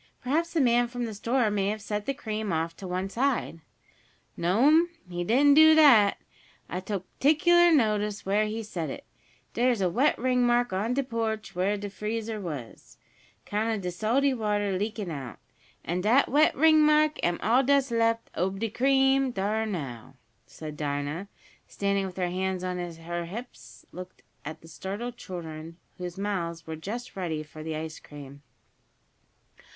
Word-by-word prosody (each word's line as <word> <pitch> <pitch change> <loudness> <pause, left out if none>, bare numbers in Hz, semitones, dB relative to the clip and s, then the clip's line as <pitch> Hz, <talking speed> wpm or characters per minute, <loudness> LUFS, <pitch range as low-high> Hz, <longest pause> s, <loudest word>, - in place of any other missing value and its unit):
Perhaps 320 +6 0
the 325 - +2
man 240 -1 +3
from 245 0 -4
the 225 - -5
store 230 +2 0
may 200 -1 0
have 215 +1 -2
set 210 0 -4
the 275 - +1
cream 215 -6 -4
off 165 0 -1
to 190 - -7
one 185 +1 -2
side." 240 -5 -1 0.8
"No'm, 275 - +4 0.2
he 175 0 -4
didn't 270 +9 +4
do 315 +1 +8
dat. 240 -10 +6 0.5
I 180 - -4
took 190 0 -4
p'ticlar 345 +4 +5
notice 210 -7 +1
where 205 +2 +2
he 220 +1 -4
set 170 -7 -4
it. - - -7 0.5
Dere's 240 -1 +2
a 185 -2 +1
wet 265 - +2
ringmark 245 -2 +2
on 215 +6 -1
de 275 - +1
porch 225 -3 -3
where 190 +3 0
de 205 0 -5
freezer 215 +2 -4
was, 120 - -8 0.5
'count 220 +2 -1
of 205 - -5
de 180 -1 -3
salty 240 +9 +1
water 205 -4 -1
leakin' 205 -1 -3
out. 135 -7 -7 0.5
An' 175 +2 -1
dat 235 +8 +4
wet 300 +4 +4
ringmark 305 0 +4
am 175 0 +1
all 235 +6 +4
dat's 275 -1 +2
left 230 0 +1
ob 190 +3 -1
de 225 -1 -2
cream, 270 +2 +3
dar 220 0 -1
now!" 135 - -6 0.4
and 155 -1 -6
Dinah, 145 +5 -3 0.4
standing 200 -1 -1
with 185 - -10
her 180 -1 -1
hands 185 0 -2
on 180 -1 -3
her 170 0 -5
hips, 230 +8 -10
looked 185 +1 -10 0.2
at 155 +2 -7
the 165 - -15
startled 205 +9 -6
children, 165 -2 -8 0.2
whose 180 0 -6
mouths 175 -5 -3
were 160 - -5
just 215 +10 -6
ready 165 -5 -3
for 155 +1 -12
the 160 0 -4
ice 160 0 -6
cream. 140 -1 -12
205 Hz, 165 wpm, -27 LUFS, 175-245 Hz, 0.8 s, do